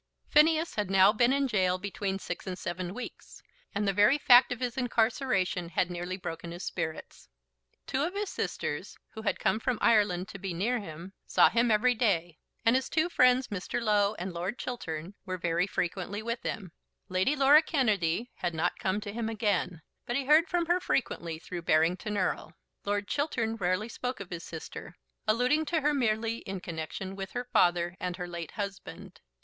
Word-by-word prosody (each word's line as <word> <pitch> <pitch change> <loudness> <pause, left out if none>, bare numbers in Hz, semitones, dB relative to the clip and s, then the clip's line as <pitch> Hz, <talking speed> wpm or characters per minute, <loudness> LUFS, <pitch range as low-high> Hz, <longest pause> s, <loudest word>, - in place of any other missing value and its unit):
Phineas 315 +2 +4
had 210 -3 -2
now 195 +1 +6
been 240 +3 +3
in 280 0 +2
gaol 185 -7 +1
between 195 0 -3
six 195 - -6
and 185 -1 -4
seven 180 +1 -4
weeks, 250 - -9 0.3
and 205 0 0
the 195 - +2
very 210 +8 +5
fact 250 -3 +7
of 245 - -3
his 245 -2 -2
incarceration 225 -7 0
had 180 +1 0
nearly 175 +1 -4
broken 165 -2 -6
his 175 +2 -7
spirits. 160 - -5 0.6
Two 265 - -1
of 345 +6 -1
his 410 -1 -2
sisters, - - -4
who 220 - -8
had - - -1
come 220 - +1
from 250 0 -1
Ireland 205 -5 +3
to 195 - -8
be 185 -2 -4
near 235 +8 0
him, 170 0 -9
saw - - +5
him 235 +1 +2
every 230 +3 +4
day, 175 -8 0 0.3
and 230 +2 +5
his 260 0 0
two 320 +2 +1
friends, 255 -4 +4
Mr. 200 +3 -3
Low 210 -2 +2
and 185 -1 -5
Lord 180 +7 -3
Chiltern, 170 -8 -5
were 185 -2 -4
very 170 +1 0
frequently 195 +3 -3
with 235 +1 -3
him; 190 -6 -4 0.4
Lady 185 +10 +1
Laura 285 +2 +7
Kennedy 225 - 0
had 175 -2 -2
not 160 - -1
come 190 +2 -1
to 205 0 -6
him 225 0 -2
again; 200 -7 -1 0.2
but 240 - -1
he 275 0 0
heard 310 +5 +5
from 350 -1 0
her 350 +2 +2
frequently 170 - -1
through 175 +2 -7
Barrington 170 +6 +1
Erle. 185 -3 -1 0.3
Lord 205 0 -1
Chiltern 235 -7 -1
rarely 185 +1 0
spoke 250 +2 -4
of 195 -2 -8
his 170 -1 -5
sister, 160 +1 -8 0.3
alluding 250 +8 +3
to 325 0 0
her 295 +1 +2
merely 225 -3 0
in 195 -1 -6
connection 175 +2 -5
with 195 -1 -6
her 245 0 -3
father 175 0 +3
and 180 0 -3
her 180 -2 -4
late 170 -2 -6
husband. 200 -1 -7
205 Hz, 190 wpm, -29 LUFS, 180-245 Hz, 0.6 s, fact